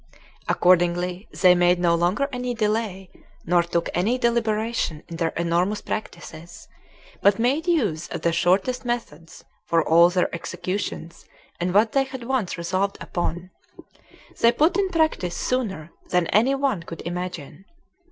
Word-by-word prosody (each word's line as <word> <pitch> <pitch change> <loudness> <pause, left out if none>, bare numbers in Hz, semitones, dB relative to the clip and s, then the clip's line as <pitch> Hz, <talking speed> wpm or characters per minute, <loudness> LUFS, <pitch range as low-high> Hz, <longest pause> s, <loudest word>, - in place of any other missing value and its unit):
Accordingly, 175 +1 +2
they 180 -1 +5
made 175 0 +3
no 175 -1 +3
longer 175 +11 +1
any 250 -1 -3
delay, 210 -4 -2 0.3
nor 175 0 +3
took 170 0 -2
any 210 +9 +1
deliberation 225 -8 -1
in 170 - -7
their 165 -1 0
enormous 175 +5 0
practices, 170 -5 -7 0.5
but 200 0 +4
made 275 +9 0
use 210 - 0
of - - -6
the 170 - +2
shortest 190 +10 +1
methods 220 -10 -5 0.2
for 165 -1 +1
all 170 +2 +6
their 180 0 0
executions 175 0 -5 0.3
and 175 +1 -1
what 215 +4 +3
they 275 -1 +2
had 260 -2 -8
once 240 -6 -2
resolved 185 +4 -1
upon, 175 +1 -4 0.9
they 230 - +5
put 310 +9 +2
in 395 -1 +1
practice 315 - 0
sooner 195 -11 -2 0.2
than 180 -1 +2
any 245 +6 +3
one 270 -9 0
could 165 -1 -9
imagine. 175 0 -6
185 Hz, 140 wpm, -23 LUFS, 170-235 Hz, 0.9 s, all